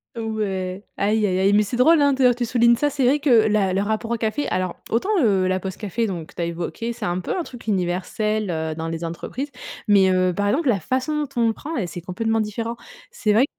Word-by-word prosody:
Ouais, 200 -4 -3
aïe, 210 +1 +2
aïe, 185 -1 +1
aïe. 195 +1 +3
Mais 210 +1 +5
c'est 225 +4 -4
drôle 315 +6 +5
hein, 285 -1 +4
d'ailleurs 255 -2 +4
que - - -22
tu - - +1
soulignes 235 0 +4
ça. 290 +4 0
C'est 275 -2 -1
vrai 265 +4 +4
que 285 -2 +1 0.2
la 200 -3 +2
le 195 - +1
rapport 220 +2 -2
au - - +2
café 225 +6 -1
alors, 185 -1 -1 0.2
autant, 240 - 0
heu, 190 -4 +3
la 185 0 +1
pause 190 0 -5
café, 225 +2 -2
donc 175 -6 -4
que - - -18
tu - - -4
as - - 0
évoqué, 175 +8 -4
c'est - - -5
un 175 +1 -1
peu 185 - -3
un 360 - -1
truc 250 -8 -10
universel, 200 +2 -1
heu, 160 -1 -2
dans 165 0 -4
les 165 +1 -4
entreprises. 250 - -5 0.4
Mais, 195 -2 +5
heu, 185 0 +2
par 205 +3 -1
exemple, 285 +3 +1
la 200 -5 +2
façon 265 - -1
dont - - -5
on 230 - +4
le 225 - +1
prend, 310 - -8 0.2
c'est 170 +1 -7
complètement 225 +5 -1
différent. 225 +2 -3 0.3
C'est 210 -1 0
vrai 240 +6 +5
215 Hz, 250 wpm, -22 LUFS, 185-235 Hz, 0.4 s, Mais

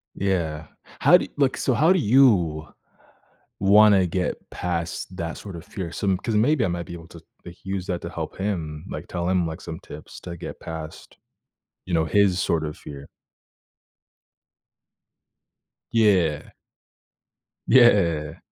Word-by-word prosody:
Yeah. 85 -6 -2 0.3
How - - +7
do - - 0
y - - -20
look. 135 -2 +1
So 130 - 0
how 160 +8 +4
do 190 - +2
you 100 - +3 0.9
wanna 100 -1 +6
get 90 +1 -1
past 85 +1 -4
that 85 -2 -4
sort 100 -4 -9
of 85 +1 -9
fear? 90 -5 -6
Some 95 +1 0
'cause 110 +3 -3
maybe 125 +3 +3
I - - 0
might 85 -1 -3
be - - -8
able 85 -1 -10
to, 85 - -13 0.2
like, 85 0 -12
use 95 -1 -4
that 90 -2 -3
to - - -6
help - - -6
him, 85 -6 -4
like, - - -7
tell 85 0 -3
him, 90 -2 +2
like, 80 +3 -7
some 80 -2 -7
tips - - -11
to 85 -1 -7
get - - -8
past, 80 -1 -9 0.7
you 90 - -2
know, 80 -1 +2
his 95 +2 +2
sort 80 -3 0
of 75 -1 -5
fear. 70 -1 -10 2.8
Yeah. 95 -9 +2 1.2
Yeah. 85 - +4
90 Hz, 150 wpm, -24 LUFS, 80-100 Hz, 2.8 s, How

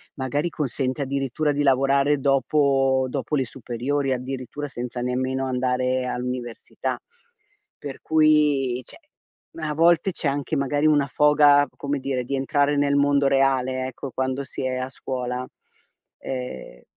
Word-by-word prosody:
magari 145 +5 -1
consente 135 -2 -2
addirittura 140 +2 -1
di 145 +1 0
lavorare 140 +1 +3
dopo 135 -1 +2
dopo 140 +3 -2
le 130 - 0
superiori. 130 +3 -2
Addirittura 130 +3 -4
senza 125 -2 -6
nemmeno 130 +2 -1
andare 130 0 0
all'università, 125 -1 -4 0.8
per 140 -2 -8
cui 150 -5 +3
cioè, - - -12 0.6
a 150 -1 -2
volte 170 +4 +3
c'è 165 - -2
anche 140 +3 -1
magari 145 +2 0
una 145 -2 +4
foga, 145 0 +5
come 140 0 -2
dire, 130 -1 -2
di 140 +3 -2
entrare 145 +1 +1
nel 140 0 +2
mondo 140 0 +3
reale 130 -1 +1
ecco, 130 +1 -7
quando 130 +1 -2
si - - -7
è 130 - -2
a 130 0 -3
scuola 125 -1 -4 0.7
e 125 - -7
135 Hz, 135 wpm, -24 LUFS, 130-145 Hz, 0.8 s, foga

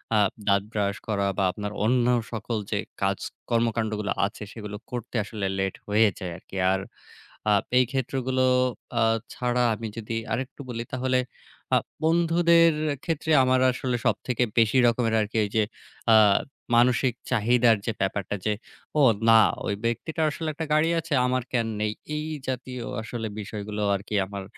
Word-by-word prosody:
আ - - +5 0.3
দাঁত 100 -1 +3
brush 100 -1 -1
করা 100 -2 0
বা 100 - +2
আপনার 105 +1 -5
অন্য 120 +1 +3 0.3
সকল 115 0 -3
যে 105 - +1 0.2
কাজ 95 0 +1 0.3
কর্মকান্ডগুলো 115 -3 0
আছে 100 +1 -6
সেগুলো 105 -2 -7
করতে 120 0 -6
আসলে 105 -1 -5
late 95 -1 -2
হয়ে 105 +1 +4
যায় 90 -2 -5
আরকি। 95 - -14 0.2
আর 95 - 0 0.7
আ - - +5 0.3
এই 125 - +5
ক্ষেত্রগুলো 130 0 0 0.6
আ - - +3 0.3
ছাড়া 125 0 0
আমি 110 +1 -5
যদি 115 0 -4 0.2
আরেকটু 130 +2 -4
বলি, 115 -1 -3
তাহলে 130 0 +1 0.6
আ - - +6 0.3
বন্ধুদের 165 0 +4 0.3
ক্ষেত্রে 160 -1 -2
আমার 130 0 +3
আসলে 125 0 -2
সবথেকে 125 -1 +1
বেশি 115 +3 +4
রকমের 115 -1 +2
আরকি 105 +1 -3
ওই 100 - -4
যে 110 - +5 0.5
আ - - +9 0.6
মানসিক 125 +1 +3 0.2
চাহিদার 120 0 +4
যে 115 - +1
ব্যাপারটা 100 +1 -1
যে, 105 - +3 0.5
"ও - - +6 0.3
না 115 0 +8 0.3
ওই - - 0
ব্যক্তিটার 155 +8 -1
আসলে 160 +2 -4
একটা 160 +2 -4
গাড়ি 155 +2 +3
আছে 165 0 -9
আমার 130 0 0
কেন 120 -3 +1
নেই?" 105 0 0 0.2
এই 150 +1 -3 0.2
জাতীয় 125 -1 -4 0.2
আসলে 115 0 -5
বিষয়গুলো 105 0 -5
আরকি 100 +2 -5
আমার 100 0 -6
115 Hz, 155 wpm, -26 LUFS, 105-130 Hz, 0.7 s, আ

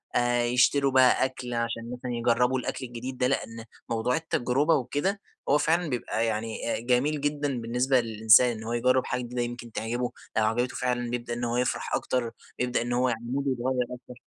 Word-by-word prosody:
آآ 120 0 +2
يشتروا 125 +3 +3
بقى 130 0 +5
أكل 125 -2 -5
عشان 115 0 -3
مثلًا 125 0 -5
يجرّبوا 120 +2 +2
الأكل 130 - -4
الجديد 125 +2 -6
ده، 125 - +2
لإن 115 -2 -3 0.2
موضوع 115 +2 0
التجرُبة 150 -1 +1
وكده 145 - -1 0.3
هو 145 - +5
فعلًا 160 +3 +1
بيبقى 120 -3 -1
يعني 115 +1 -2
آآ، - - -3
جميل 130 +5 +1
جدًا 145 -4 -1
بالنسبة 125 +3 +2
للإنسان 110 +1 +4
إن 110 - -8
هو 115 +1 -3
يجرّب 125 +2 +2
حاجة 125 +1 -2
جديدةُ 125 0 -3
يمكن 120 0 -5
تعجبه، 120 +3 -2 0.3
لو 110 - +3
عجبته 120 +3 0
فعلًا 120 -1 -1
يبدأ 120 0 -4
إن 120 +1 -4
هو 120 0 0
يفرح 125 - -1
أكتر، 120 -3 -1 0.3
يبدأ 125 -1 0
إن 120 +1 -2
هو 125 +1 +2
يعني 115 -1 -3
مودُه 140 0 0
يتغيّر 125 0 0
اكتر. 125 0 -11
125 Hz, 190 wpm, -27 LUFS, 120-130 Hz, 0.3 s, بقى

